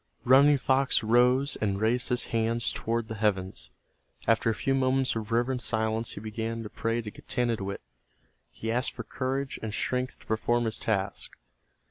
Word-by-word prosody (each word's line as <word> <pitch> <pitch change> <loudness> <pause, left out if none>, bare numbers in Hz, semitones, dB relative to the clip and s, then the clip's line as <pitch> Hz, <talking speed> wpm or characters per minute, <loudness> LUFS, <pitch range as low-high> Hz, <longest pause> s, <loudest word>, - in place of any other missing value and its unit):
Running 140 +3 +6
Fox 130 -1 +2
rose 125 +5 +3
and 100 -2 -1
raised 115 +3 +1
his 125 - +1
hands 115 +1 +1
toward 115 0 -2
the 110 - -5
heavens. 95 - -1 0.6
After 115 0 +3
a 110 - 0
few 135 - 0
moments 130 -1 +2
of 110 0 -4
reverent 120 +2 +1
silence 110 0 -1
he - - -7
began 115 +2 -4
to 105 - -8
pray 115 +1 -1
to 105 - -6
Getanittowit. 110 -6 -2 0.7
He 115 - -4
asked 125 +2 0
for - - -6
courage 135 +2 -3
and 110 - -4
strength 125 0 -1
to - - -18
perform 120 +2 +1
his 110 - -2
task. 100 -3 -1
115 Hz, 165 wpm, -28 LUFS, 110-125 Hz, 0.7 s, Running